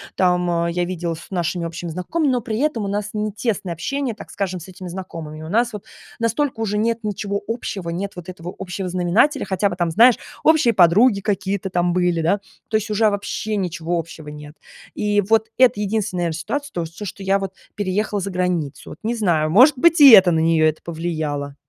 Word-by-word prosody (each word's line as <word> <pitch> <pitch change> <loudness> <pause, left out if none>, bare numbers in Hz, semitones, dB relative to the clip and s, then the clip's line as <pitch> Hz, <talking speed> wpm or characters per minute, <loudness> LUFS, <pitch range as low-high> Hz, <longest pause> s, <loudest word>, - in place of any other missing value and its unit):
там, 180 -1 +2
а, 170 0 0
я 175 +1 -1
виделась 170 -2 -4
с - - -16
нашими 175 -1 -2
общими 170 +1 -5
знакомыми, 265 - -1
но 245 - 0
при 220 -1 -3
этом 285 -7 0
у - - -3
нас 205 +1 -2
не 210 0 -2
тесное 205 -4 -2
общение, 260 - -3
так 220 - -12
скажем, 185 -2 -3
с 170 - -11
этими 185 0 -9
знакомыми. 165 -4 -7
У 160 - -8
нас 235 +3 +1
вот 210 - -7 0.3
настолько 230 +2 -1
уже 210 -2 -1
нет 230 +2 0
ничего 200 -1 -3
общего, 205 -6 -4
нет 195 +4 -4
вот 180 0 -9
этого 180 -1 -8
общего 185 0 -4
знаменателя, 185 - +2
хотя 195 +1 0
бы 180 - -5
там, 175 -2 0
знаешь, 235 +8 +6 0.3
общие 310 -7 +4
подруги 200 +4 +5
какие-то 195 -1 -2
там 175 -1 0
были, 175 -2 +1
да. 185 +5 +1 0.3
То 220 - +1
есть 215 0 -4
уже 215 +1 +3
вообще 205 +1 -3
ничего 175 -3 -2
общего 165 -2 -7
нет. 150 0 -10 0.4
И 205 0 +1
вот 220 +2 +1
это 250 -4 +4
единственная, 205 -3 -1
наверно, 165 -1 -2
ситуация, 285 - -4
то, 175 - -2
вот 165 - -5
всё, 205 +5 -9
что 195 +1 -7
я 195 +1 +2
вот 195 -1 -5 0.2
переехала 205 +1 -1
за 195 - -3
границу, 180 -6 -2
вот. - - -10
Не 230 +2 -1
знаю, 165 -8 +1
может 255 - +6
быть, 335 +3 +4
и 280 - +11
это 190 -4 +8
на 160 - +2
нее 160 -1 +3
это 155 - -6
повлияло. 155 -4 -4
190 Hz, 215 wpm, -21 LUFS, 170-215 Hz, 0.4 s, и